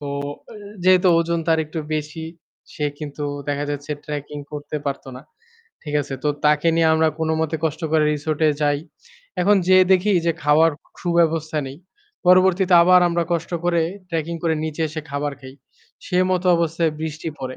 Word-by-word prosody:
তো 145 Hz, -, -6 dB, 0.8 s
যেহেতু 185 Hz, 0 st, +5 dB
ওজন 170 Hz, 0 st, 0 dB
তার 160 Hz, -1 st, +3 dB
একটু 155 Hz, +2 st, -5 dB, 0.2 s
বেশি, 155 Hz, +2 st, -5 dB, 0.5 s
সে 150 Hz, -, -2 dB
কিন্তু 150 Hz, -1 st, -6 dB, 0.3 s
দেখা 145 Hz, 0 st, -1 dB
যাচ্ছে 145 Hz, +1 st, -5 dB
trekking 145 Hz, 0 st, -6 dB
করতে 150 Hz, 0 st, -5 dB
পারত 140 Hz, -1 st, -3 dB
না। 130 Hz, -, -9 dB, 0.6 s
ঠিক 150 Hz, -2 st, -6 dB
আছে? 140 Hz, -1 st, -6 dB
তো -, -, +2 dB, 0.2 s
তাকে 150 Hz, +2 st, +3 dB
নিয়ে 165 Hz, -1 st, +4 dB
আমরা 160 Hz, 0 st, +3 dB
কোনমতে 160 Hz, 0 st, -1 dB
কষ্ট 160 Hz, 0 st, -2 dB
করে 160 Hz, -1 st, +4 dB
resort-এ 155 Hz, +1 st, 0 dB
যাই। 145 Hz, -1 st, +2 dB, 0.6 s
এখন 205 Hz, +3 st, +4 dB
যেয়ে 185 Hz, 0 st, +6 dB
দেখি 190 Hz, +3 st, +3 dB
যে 170 Hz, -, +3 dB
খাওয়ার 150 Hz, +3 st, +4 dB, 0.3 s
খুব 175 Hz, -, -2 dB
ব্যবস্থা 160 Hz, -1 st, 0 dB
নেই। 135 Hz, -, -9 dB, 0.5 s
পরবর্তীতে 185 Hz, 0 st, +5 dB
আবার 180 Hz, +1 st, +6 dB
আমরা 170 Hz, 0 st, 0 dB
কষ্ট 170 Hz, 0 st, -2 dB
করে 175 Hz, -1 st, +2 dB, 0.3 s
trekking 165 Hz, 0 st, -3 dB
করে 165 Hz, -2 st, +1 dB
নিচে 160 Hz, +1 st, -3 dB
এসে 155 Hz, +1 st, -5 dB
খাবার 145 Hz, +1 st, -2 dB
খাই। 130 Hz, 0 st, -11 dB, 0.5 s
সে 180 Hz, -2 st, 0 dB
মত 180 Hz, -1 st, +1 dB
অবস্থায় 165 Hz, -1 st, 0 dB
বৃষ্টি 160 Hz, +1 st, -4 dB
পড়ে। 130 Hz, 0 st, -5 dB
160 Hz, 165 wpm, -21 LUFS, 150-170 Hz, 0.8 s, যেয়ে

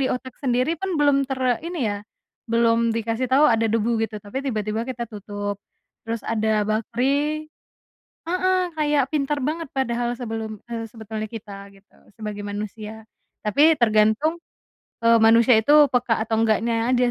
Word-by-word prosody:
di 265 Hz, -, +2 dB
otak 250 Hz, 0 st, -7 dB
sendiri 255 Hz, +2 st, +1 dB
pun 385 Hz, -, -2 dB
belum 285 Hz, -1 st, +4 dB
ter 265 Hz, -1 st, -3 dB, 0.3 s
ini 350 Hz, 0 st, -5 dB
ya, 205 Hz, -, -2 dB, 0.6 s
belum 230 Hz, 0 st, +3 dB, 0.2 s
dikasih 230 Hz, +2 st, -1 dB
tau 280 Hz, +3 st, +6 dB
ada 225 Hz, 0 st, +2 dB
debu 230 Hz, 0 st, +1 dB, 0.2 s
gitu 220 Hz, -, -7 dB
tapi 205 Hz, +6 st, -9 dB
tiba-tiba 215 Hz, -4 st, -2 dB
kita 240 Hz, -3 st, -5 dB
tutup, 205 Hz, -1 st, -5 dB, 0.5 s
terus 230 Hz, -1 st, -3 dB
ada 220 Hz, -1 st, 0 dB, 0.2 s
bakteri 280 Hz, +8 st, 0 dB, 0.8 s
heeh, 370 Hz, +2 st, +1 dB, 0.2 s
kayak 295 Hz, -2 st, +2 dB
pintar 295 Hz, -1 st, 0 dB
banget 330 Hz, +1 st, -3 dB
padahal 240 Hz, -2 st, 0 dB
sebelum, 225 Hz, -2 st, -4 dB, 0.2 s
eee, 230 Hz, -1 st, -4 dB
sebetulnya 220 Hz, -2 st, -6 dB
kita 205 Hz, -2 st, -8 dB, 0.2 s
gitu 195 Hz, 0 st, -24 dB, 0.2 s
sebagai 210 Hz, -1 st, -6 dB
manusia, 210 Hz, +2 st, -6 dB, 0.4 s
tapi 290 Hz, +10 st, +4 dB
tergantung, 220 Hz, +8 st, +3 dB, 0.7 s
eee, 230 Hz, 0 st, +5 dB
manusia 230 Hz, +2 st, +6 dB
itu 255 Hz, +7 st, +2 dB, 0.2 s
peka 245 Hz, -2 st, +1 dB
atau 225 Hz, 0 st, -1 dB
enggaknya 225 Hz, +1 st, +2 dB, 0.2 s
aja 245 Hz, 0 st, +2 dB
230 Hz, 145 wpm, -23 LUFS, 220-270 Hz, 0.8 s, tau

